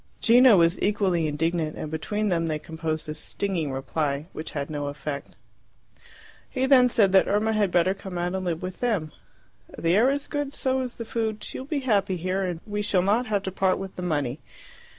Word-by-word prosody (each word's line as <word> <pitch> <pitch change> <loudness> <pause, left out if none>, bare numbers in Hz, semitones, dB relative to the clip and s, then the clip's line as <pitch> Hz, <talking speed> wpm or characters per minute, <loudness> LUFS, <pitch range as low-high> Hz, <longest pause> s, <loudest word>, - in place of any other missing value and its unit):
Gino 245 -2 +7
was 170 +1 +3
equally 190 -6 +1
indignant, 160 +1 -1
and 155 - -5
between 210 +7 -1
them 165 -2 +1
they 155 -1 -1
composed 160 0 -4
a 150 - -3
stinging 165 0 -3
reply, 140 +2 -2
which 155 - -6
had 140 -1 -3
no 145 -1 -4
effect. 145 0 -6 1.1
He 260 0 0
then 260 -2 +6
said 205 -5 +3
that 190 0 +5
Irma 215 +2 +1
had 210 -2 +2
better 175 +1 +3
come 190 -2 -8
out 175 +1 -1
and 190 0 -2
live 170 -1 -2
with 185 0 -5
them. 205 -11 0 0.7
"The 165 +2 +2
air 235 +6 +5
is 280 +1 -1
good, 290 -1 -3
so 260 0 0
is 250 -2 -4
the 230 - -6
food; 220 -1 -2
she - - -6
will 260 - -8
be 290 -2 -1
happy 200 -7 +1
here, 185 +3 -1
and 175 -3 -3
we 210 -1 -3
shall 195 -3 +1
not 220 +6 +2
have 205 -2 0
to 190 - -3
part 190 0 +1
with 195 -1 -7
the - - -6
money." 145 -6 -1
185 Hz, 210 wpm, -25 LUFS, 160-215 Hz, 1.1 s, Gino